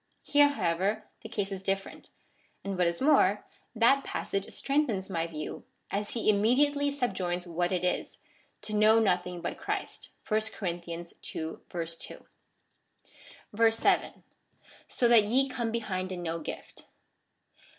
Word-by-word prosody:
Here, 290 0 +5
however, 200 -3 0 0.2
the 220 - -9
case 205 -2 -2
is 190 -1 -4
different, 195 0 -3 0.5
and, 195 0 -3
what 180 -1 +2
is 170 +5 -2
more, 260 -9 +4 0.3
that 245 +5 +4
passage 195 0 -3
strengthens 255 -10 0
my 165 -2 -1
view, 155 -2 -6 0.3
as 205 +1 -2
he 230 - -1
immediately 285 +8 +3
subjoins 185 -10 -2
what 175 +1 -1
it 180 -1 0
is^ 180 - -1 0.2
— - - -37
to 215 - -5
know 215 +1 +6
nothing 180 -4 +1
hut - - -4
Christ. - - -4 0.2
(Chap. 215 -5 -1
ii. 170 0 -5 0.2
2.) 160 0 -5 2.1
7. 225 0 +1 0.6
So 245 - +1
that 235 -2 +7
ye 260 +6 +3
come 240 -3 -2
behind 190 -5 -2
in 180 -1 -5
no 165 0 -2
gift. 155 - -8
200 Hz, 135 wpm, -29 LUFS, 180-235 Hz, 2.1 s, that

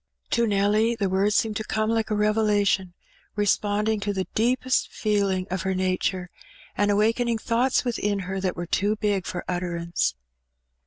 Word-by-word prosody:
To 235 0 +2
Nelly 210 +3 +2
the 200 -4 -1
words 195 +2 +2
seemed 215 -2 +1
to 220 - -3
come 215 0 -1
like 225 -1 0
a 215 - 0
revelation^ 210 -3 +2 0.4
responding 210 +1 +1
to 205 0 -2
the 190 -1 -2
deepest 255 +3 +1
feeling 200 -3 0
of 185 -1 -1
her 190 0 -1
nature, 185 -1 -1 0.4
and 205 +1 +1
awakening 225 +3 +2
thoughts 240 +4 +1
within 210 -4 0
her 190 +1 -4
that 185 -2 -1
were 175 - -4
too 205 +5 +1
big 205 -3 -1
for 175 - -4
utterance. 175 -1 -1
205 Hz, 160 wpm, -25 LUFS, 190-220 Hz, 0.4 s, To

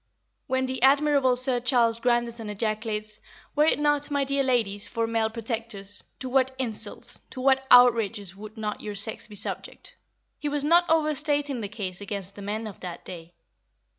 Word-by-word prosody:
When 260 -1 0
the 260 -1 -3
admirable 275 -1 +4
Sir 250 0 +2
Charles 240 -2 +3
Grandison 235 -2 0
ejaculates, 215 0 -2 0.4
"Were 300 0 +4
it - - +3
not, 295 0 +1
my 285 -1 +1
dear 275 +1 +1
ladies, 225 -6 +1
for 230 -1 -1
male 225 -1 0
protectors, 225 -3 -4
to 260 - -5
what 260 0 +1
insults, 235 -5 -4
to - - -9
what 265 0 +2
outrages, 225 -6 +5
would 215 +2 -11
not 210 -1 -4
your 210 -1 -6
sex 210 +3 +1
be 210 - -11
subject?" 205 - -2 0.4
he 295 - -2
was 290 -1 -1
not 345 +3 +4
overstating 295 -4 +1
the 205 - -4
case 195 -3 -5
against 200 -1 -5
the 205 - -11
men 210 +3 -3
of 210 -3 -8
that 180 -2 -8
day. 170 -1 -10
235 Hz, 170 wpm, -26 LUFS, 210-265 Hz, 0.4 s, outrages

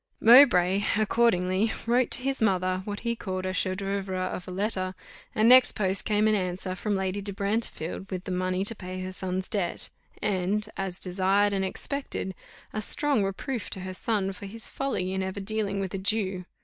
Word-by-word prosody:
Mowbray, 205 -6 +7
accordingly, 215 -2 +2
wrote 245 +2 +2
to 250 - +4
his 270 -1 -1
mother 185 -3 +1
what 205 0 -5
he 235 0 -1
called 185 -4 -4
a 185 - -2
chef 185 +1 0
d'oeuvre 195 -1 -2 0.2
of 180 - -6
a - - -6
letter, 185 -1 -1 0.4
and 215 +1 +4
next 255 +1 +8
post 190 -1 0
came 215 0 +2
an 215 - +3
answer 185 -1 -2
from 205 +3 -2
Lady 190 +1 -2
de 200 0 -4
Brantefield 200 -3 -3
with 185 -2 -4
the 190 - -5
money 185 +1 -1
to 230 - +2
pay 185 -3 -7
her 185 0 -5
son's 185 0 -3
debt, 185 -5 -2 0.3
and, 205 +2 0
as 190 -2 -3
desired 195 +3 +2
and 195 -1 0
expected, 190 0 -3 0.4
a 215 - -2
strong 275 +1 +1
reproof 210 +5 -3
to 190 - -6
her 185 0 -5
son 195 -1 -1
for 200 +2 -8
his 225 +3 -7
folly 190 -9 -2
in 190 - -1
ever 190 +1 -3
dealing 200 0 -2
with 195 -1 -3
a 195 - -2
Jew. 190 -3 0
195 Hz, 190 wpm, -27 LUFS, 185-215 Hz, 0.4 s, next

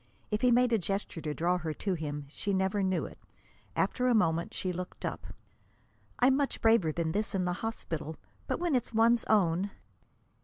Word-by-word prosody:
If 210 - 0
he 250 - +5
made 245 0 +4
a 225 - +4
gesture 195 -2 -3
to 150 -1 -3
draw 175 +2 +1
her 160 -3 -3
to 195 +4 -1
him, 145 -3 -4
she 200 +7 -3
never 190 +2 +1
knew 190 -1 +1
it. - - -11 0.6
After 250 0 +1
a 245 - +4
moment 170 -5 +2
she 185 -1 -2
looked 180 +1 -6
up. - - -4 0.9
"I'm 260 +2 +5
much 280 0 0
braver 225 -8 +4
than 160 0 -1
this 210 +3 -1
in 185 -1 +1
the 180 - 0
hospital. 160 -8 -4 0.3
But - - -1
when 345 -3 0
it's 240 -3 0
one's 230 +1 +4
own!" 190 -2 +2
190 Hz, 190 wpm, -30 LUFS, 170-225 Hz, 0.9 s, he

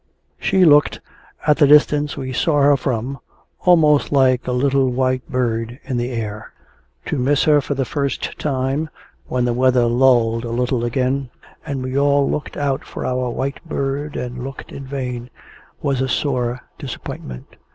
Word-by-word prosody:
She 190 -1 +3
looked, 150 -2 +5 0.5
at 150 -1 +4
the 145 - +5
distance 150 0 +4
we 130 -1 -4
saw 145 +2 +2
her 145 0 +6
from, 130 0 -3 0.4
almost 155 -5 +4
like 130 -3 +3
a - - 0
little 135 +1 +2
white 130 +1 -1
bird 120 -2 -1
in 130 -2 -3
the 120 +1 -1
air. 110 -3 -5 0.5
To 150 - -2
miss 140 +3 +2
her 150 -1 +4
for 140 - -3
the 135 -1 -1
first 140 -3 -3
time, 140 +2 -1 0.4
when 125 -1 0
the 120 - +1
weather 125 0 +3
lulled 120 -2 +3
a 120 - -4
little 125 +1 0
again, 130 +2 -1 0.4
and 135 -2 -3
we 130 +2 -1
all 140 0 +3
looked 150 - -3
out 140 -1 -1
for - - -7
our 125 -1 -1
white 135 +3 -4
bird 145 -2 -3
and 125 0 -5
looked 135 +1 -8
in 135 - -8
vain, 125 -3 -4 0.5
was 135 -2 0
a 130 - -1
sore 125 -3 -1 0.2
disappointment. 65 -1 -8
130 Hz, 165 wpm, -20 LUFS, 125-140 Hz, 0.5 s, her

